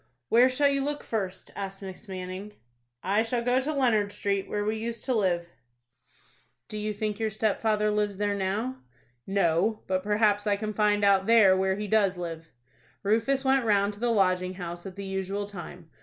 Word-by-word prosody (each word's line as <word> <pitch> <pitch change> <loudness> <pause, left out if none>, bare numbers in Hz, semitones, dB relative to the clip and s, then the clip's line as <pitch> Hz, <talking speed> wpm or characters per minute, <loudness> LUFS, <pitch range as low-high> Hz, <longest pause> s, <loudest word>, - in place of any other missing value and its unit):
"Where 245 +3 +6
shall 280 +3 +3
you 275 -1 0
look 290 +1 -3
first?" 195 -4 -4
asked 195 0 -6
Miss 190 +3 -9
Manning. 185 +2 -6 0.5
"I 200 +4 +2
shall 235 +1 -1
go 250 +2 +2
to 290 +4 -2
Leonard 230 -8 +2
Street, 200 -1 -2
where 205 0 -1
we 215 +1 0
used 230 0 -5
to 260 - +1
live." 175 -6 0 1.2
"Do - - -8
you 210 0 -2
think 210 0 -3
your 220 -1 0
stepfather 215 0 +1
lives 210 -1 0
there 205 0 0
now?" 205 +6 -2 0.5
"No; 195 +2 +1
but 185 0 0
perhaps 210 +1 +2
I 205 - +3
can 215 +1 -4
find 210 -1 +2
out 195 -1 +4
there 220 -5 +6
where 190 0 +1
he 210 +1 -4
does 205 -3 +2
live." 165 -2 -6 0.5
Rufus 230 +7 +1
went 265 -1 +3
round 205 -2 +2
to 205 - -13
the 240 +1 0
Lodging 185 -4 +1
House 175 0 -6
at 185 - -9
the 200 - -6
usual 195 +1 -3
time. 175 -4 -10
205 Hz, 185 wpm, -27 LUFS, 190-220 Hz, 1.2 s, Where